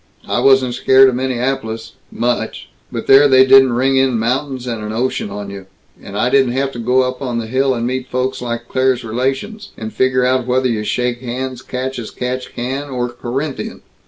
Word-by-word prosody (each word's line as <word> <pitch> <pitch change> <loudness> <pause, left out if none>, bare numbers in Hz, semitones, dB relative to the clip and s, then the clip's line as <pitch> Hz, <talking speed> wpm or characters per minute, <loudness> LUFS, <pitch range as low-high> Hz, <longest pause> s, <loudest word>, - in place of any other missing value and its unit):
I - - 0
wasn't 130 -2 +4
scared 130 +2 +5
of - - -2
Minneapolis 125 -3 -2 0.2
much 120 0 -2 0.2
but - - -4
there 135 +2 +7
they 130 -1 +6
didn't 135 -1 +6
ring 135 +2 +2
in 130 -2 +2
mountains 130 +3 -2
and 115 -3 -4
an 105 - -4
ocean 120 -1 -2
on 100 0 -6
you. 100 -1 -9 0.3
And 100 - -8
I 125 +4 +1
didn't 135 -3 +3
have 135 +1 -1
to 120 - -8
go 125 +3 +2
up 130 +1 -4
on 125 -3 -2
the 115 - -2
hill 130 +3 +1
and 115 0 -2
meet 130 +1 -3
folks 130 +1 -2
like 120 -1 -4
Claire's 130 -1 +1
relations, 135 - -3
and 110 0 -6
figure 130 -1 +2
out 130 -1 +1
whether 130 +1 +2
you 110 -3 -1
shake 125 +2 -1
hands 130 0 -4
catch 130 0 -4
as 115 - -6
catch 125 +1 -5
can 135 +4 -3
or 125 -2 -2
Corinthian. 130 +4 -5
125 Hz, 200 wpm, -17 LUFS, 120-130 Hz, 0.3 s, there